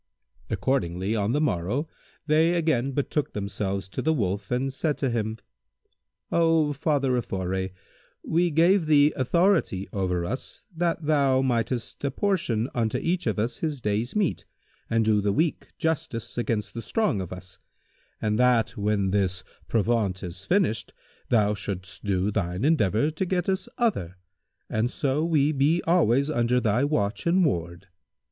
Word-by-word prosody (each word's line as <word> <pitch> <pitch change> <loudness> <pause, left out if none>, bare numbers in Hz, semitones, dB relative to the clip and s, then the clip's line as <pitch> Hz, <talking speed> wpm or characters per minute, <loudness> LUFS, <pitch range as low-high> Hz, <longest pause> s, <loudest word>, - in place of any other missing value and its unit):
Accordingly, 100 -5 0
on 105 0 0
the 145 - +1
morrow, 125 - 0 0.4
they 160 +3 +3
again 155 -6 +1
betook 145 +2 -1
themselves 100 -1 -3
to - - -4
the 160 +1 +1
Wolf 100 -4 -2
and 130 +2 -1
said 150 +2 -1
to 135 -3 0
him, 110 -1 -2 0.9
"O 165 -3 +3
Father 140 -3 +1
of 120 - -2
Foray, 95 0 -2 0.5
we 175 +2 +2
gave 170 +2 +3
thee 150 -1 +5
authority 150 - +2
over 90 -3 -1
us, 130 +9 -6
that 170 0 0
thou 140 -3 +3
mightest 120 -1 -1
apportion 140 - 0
unto 115 -3 0
each 175 -4 -1
of 110 - 0
us 115 +3 -1
his 155 -4 -2
day's 110 +2 -1
meat 205 -6 0 0.5
and 115 -1 +2
do 105 -1 +3
the 100 0 +1
weak 160 +9 0
justice 150 -8 -2
against 115 -3 -2
the 115 - -5
strong 180 - 0
of 90 - -7
us, 90 0 -9 0.6
and 105 +1 0
that, 125 -2 +3
when 100 -3 0
this 95 -2 0 0.2
provaunt 110 -4 0
is 90 +1 -7
finished, 175 - +1 0.4
thou 105 -3 +3
shouldst 95 -2 -6
do 100 0 0
thine 95 +1 -1
endeavour 145 - +2
to 160 +4 -2
get 180 -1 -1
us 190 0 -1
other 100 - 0 0.5
and 110 +2 0
so 140 +3 0
we 155 -3 +2
be 150 +4 +2
always 140 -6 +3
under 125 -4 +1
thy 115 +2 +1
watch 110 -4 -1
and 180 +1 +4
ward. 85 - -2
120 Hz, 155 wpm, -26 LUFS, 100-155 Hz, 0.9 s, thee